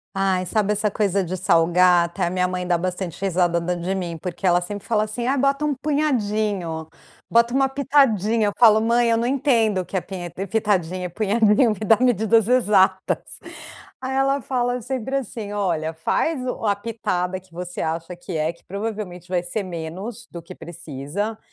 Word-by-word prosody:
Ai, 190 -1 +1
sabe 210 +2 +1
essa 210 0 0
coisa 200 -2 +1
de 185 +2 -4
salgar, 175 0 +4
até 170 +2 -2
a 170 - 0
minha 180 0 0
mãe 180 0 -3
dá 175 - +2
bastante 180 0 -4
risada 175 -2 +1
da 180 +1 -1
de 180 +3 -2
mim, 170 -3 -4
porque 180 +3 -6
ela 175 -1 +4
sempre 200 +3 -6
fala 215 -2 +1
assim: 225 +3 -4
"Ai, 270 +3 +1
bota 275 +2 +1
um 300 -1 +1
punhadinho, 215 - -1 0.4
bota 235 +1 +3
uma 270 0 +3
pitadinha." 230 -6 +2
Eu - - +1
falo: 220 -2 +7
"Mãe, 235 +1 +2
eu 230 - +3
não 230 +1 0
entendo 240 -6 +2
o 180 - -3
que 190 - -8
é 185 - +1
pinhe 175 -2 -7
pitadinha, 185 -2 -1
punhadinho, 215 +4 +3
me 210 - -4
dá 225 - +6
medidas 225 -2 +3
exatas." 210 -7 +2 0.6
Aí 260 0 -4
ela 275 +1 +2
fala 245 -1 -1
sempre 265 +1 -4
assim: 225 -4 -6
"Olha, 165 -6 -1
faz 255 - -1
o 250 -3 -3
a 205 - +3
pitada 190 -4 -2
que 185 -1 -21
você 180 +1 -6
acha 165 +2 -3
que 175 -1 -6
é, 155 +2 0
que 170 - -26
provavelmente 200 -3 -5
vai 180 -1 -1
ser 200 +4 -3
menos 185 +7 -6
do 170 -1 -9
que 180 +2 -11
precisa 170 +5 -5
200 Hz, 185 wpm, -22 LUFS, 175-230 Hz, 0.6 s, falo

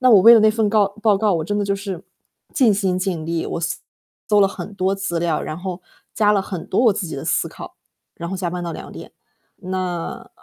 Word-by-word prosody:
那 255 -1 +5
我 210 -5 +8
为 230 +5 +9
了 225 - +6
那 215 0 +5
份 220 -1 +1
告 205 -1 +3
报 215 -3 +4
告， 210 0 +2
我 160 - 0
真 205 +3 -1
的 205 - 0
就 200 - 0
是 195 -3 -6 0.5
尽 245 -6 +4
心 190 -2 0
尽 180 -4 -2
力， 165 0 -2
我 - - -3 0.7
搜 210 -1 +4
了 - - +5
很 200 +1 -7
多 190 0 0
资 195 -3 -2
料， 165 -2 0
然 155 - -5
后 185 0 -5 0.3
加 210 -1 +3
了 200 -2 +2
很 185 -4 -6
多 195 - +1
我 225 - +6
自 190 -2 -3
己 160 - -6
的 135 - -6
思 - - +1
考， - - -11 0.4
然 170 - -6
后 190 - -3
加 180 -2 -2
班 180 0 -4
到 170 -1 -4
2 - - -8
点。 - - -10 0.4
那 180 -2 -4
195 Hz, 255 characters per minute, -21 LUFS, 175-210 Hz, 0.7 s, 为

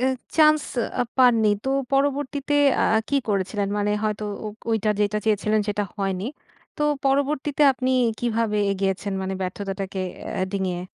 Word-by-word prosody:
অ্যা 260 - +2 0.3
chance 305 -1 +5 0.4
আ - - +5 0.2
পাননি। 230 -4 +5
তো 265 - 0 0.2
পরবর্তীতে 285 +1 0 0.3
আ - - +3 0.2
কী 280 - +1
করেছিলেন? 200 0 -1
মানে 205 0 0
হয়তো 215 0 -1 0.2
ও - - -3 0.2
ওইটা 220 -1 +1
যেটা 210 0 +1
চেয়েছিলেন, 215 0 +2
সেটা 205 0 0
হয়নি। 195 -1 -2 0.5
তো - - -2 0.2
পরবর্তীতে 285 +1 +1
আপনি 260 0 -2 0.3
কীভাবে 230 -3 0
এগিয়েছেন, 195 +1 -2
মানে 190 0 -3
ব্যর্থতাটাকে 195 +1 -4 0.4
আ - - +1
ডিঙিয়ে? 185 -3 -2
215 Hz, 140 wpm, -24 LUFS, 195-265 Hz, 0.5 s, chance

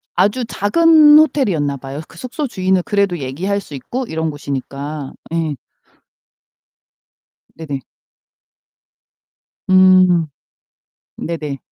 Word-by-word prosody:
아주 210 +6 +1
작은 305 +7 +5
호텔이었나 185 - +2
봐요. 135 +3 -7
그 165 - -17
숙소 265 - -4
주인은 185 -3 0
그래도 200 -4 0
얘기할 180 +10 -3
수 155 - -13
있고 245 - -5
이런 160 0 -2
곳이니까. 140 0 -6 0.2
예. 160 -3 -1 2.0
네네. 145 -4 -5 1.9
음. 185 -3 +5 0.9
네네. 150 -4 -5
175 Hz, 195 characters per minute, -17 LUFS, 145-205 Hz, 2.0 s, 작은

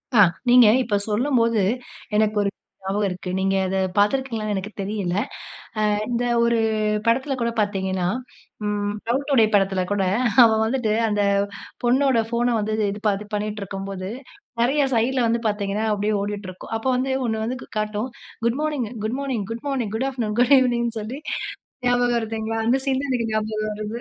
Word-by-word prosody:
ஆ. - - +6 0.3
நீங்க 245 -2 +8 0.2
இப்ப 210 -4 -1
சொல்லும்போது 230 -1 +2 0.5
எனக்கு 215 0 +2
ஒரு 200 - +1 0.3
ஞாபகம் 200 +2 0
இருக்கு. 180 0 -5
நீங்க 195 0 +1
அத 190 +1 -1 0.2
பார்த்திருக்கீங்களான்னு 215 -1 +1
எனக்கு 195 +3 -4
தெரியல. 195 -3 -2 0.8
ஆ - - +2 0.2
இந்த 245 0 0 0.2
ஒரு 235 0 +3 0.5
படத்தில 265 +4 +2
கூட 235 - +1
பார்த்தீங்கன்னா, 190 -3 -1 0.6
ம் 205 0 -1 0.2
"லவ் 265 +4 +1
டுடே" 235 -6 +5
படத்தில 195 -2 +3
கூட 200 -1 +1 0.4
அவ 230 - +7
வந்துட்டு 225 -2 0 0.2
அந்த 210 -1 +1 0.6
பொண்ணோட 260 0 +3
ஃபோன 240 0 +1
வந்து 215 0 -1 0.2
இது 205 - -6
ப - - +5 0.2
பண்ணிட்டு 210 0 -2
இருக்கும்போது, 195 0 -5 0.5
நெறைய 275 +5 +3
சைட் 240 +4 +1
ல 245 - +3
வந்து 230 +1 +1
பார்த்தீங்கன்னா, 205 +1 -1
அப்பிடியே 210 +1 0
ஓடிட்டிருக்கும். 200 -2 -6
அப்ப 225 - -6
வந்து 260 +1 0
1 220 -1 -1
வந்து 250 +3 -3 0.2
காட்டும். 215 +2 -2 0.4
Good morning, 290 +1 0 0.2
good morning, 250 -2 -2
good 230 +2 -5
morning, 245 -7 -1
good 260 +4 0
afternoon, 225 -5 -3
good 250 +3 +6
ஈனிங்னு 235 -3 +1
சொல்லி 230 +6 -5 0.7
ஞாபகம் 245 -1 +3
இருக்குங்களா? 225 0 -3
அந்த 250 +3 +4
சீன் 265 -1 +1
தான் 280 - -3
எனக்கு 230 -3 -1
ஞாபகம் 215 0 -1
வருது 215 +2 -4
220 Hz, 155 wpm, -23 LUFS, 205-245 Hz, 0.8 s, நீங்க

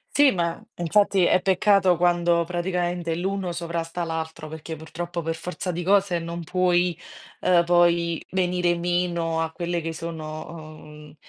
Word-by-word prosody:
Sì, 290 -1 +7
ma 170 -2 -2
infatti 195 +2 +2
è 180 - +3
peccato 190 -1 +3
quando 175 -1 +3
praticamente 175 -1 -2
l'uno 190 +1 -2
sovrasta 170 0 -3
l'altro, 160 -1 -4
perché 160 +1 -7
purtroppo 170 +2 -5
per 165 +1 -1
forza 180 +2 -5
di 175 +1 -3
cose 195 -1 +2
non 170 +1 -5
puoi, 180 0 +2 0.4
ehm, 175 -2 +4
poi 170 -1 +3
venire 180 -2 +1
meno 170 -2 0
a 160 0 -2
quelle 170 0 -2
che 165 0 -3
sono, 155 -1 -6 0.3
uhm, 150 0 -13
175 Hz, 145 wpm, -24 LUFS, 165-180 Hz, 0.4 s, Sì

